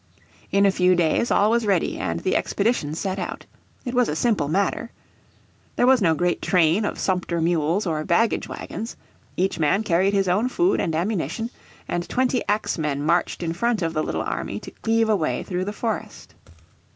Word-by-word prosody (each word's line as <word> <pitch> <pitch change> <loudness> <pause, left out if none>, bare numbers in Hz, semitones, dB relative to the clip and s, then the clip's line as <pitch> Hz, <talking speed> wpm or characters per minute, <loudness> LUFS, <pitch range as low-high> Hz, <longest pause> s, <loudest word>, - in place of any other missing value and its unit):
In 200 0 +4
a 195 - +5
few 180 -1 +3
days 175 +7 +1
all 210 +2 +3
was 235 -2 +1
ready, 190 -4 +1
and 85 -3 -2
the - - 0
expedition 200 -9 0
set 190 +3 -3
out. 180 - -5 0.4
It 245 - -3
was 250 -2 +2
a 150 - -1
simple 215 -6 +1
matter. 195 +7 0 0.9
There 245 - +3
was 260 -2 +5
no 165 -4 +3
great 175 +2 0
train 180 +3 +3
of - - -3
sumpter 180 -2 -1
mules 165 +3 +1
or 155 -3 -1
baggage 220 +8 +1
wagons. 225 +2 -6 0.4
Each 185 -2 0
man 160 +7 +2
carried 190 +1 +2
his 195 -1 +2
own 205 +8 +2
food 355 +8 +2
and 160 - -1
ammunition, 215 +6 -2 0.4
and 175 0 -3
twenty 255 0 +1
axemen 155 -9 -1
marched 170 +2 +1
in 165 -1 -1
front 230 +2 0
of 165 0 -1
the 155 - 0
little - - -2
army - - -3
to - - -9
cleave 225 0 +1
a 215 - +3
way 155 -9 -1
through 185 0 -3
the 205 - -3
forest. 220 0 -5
185 Hz, 190 wpm, -23 LUFS, 165-220 Hz, 0.9 s, a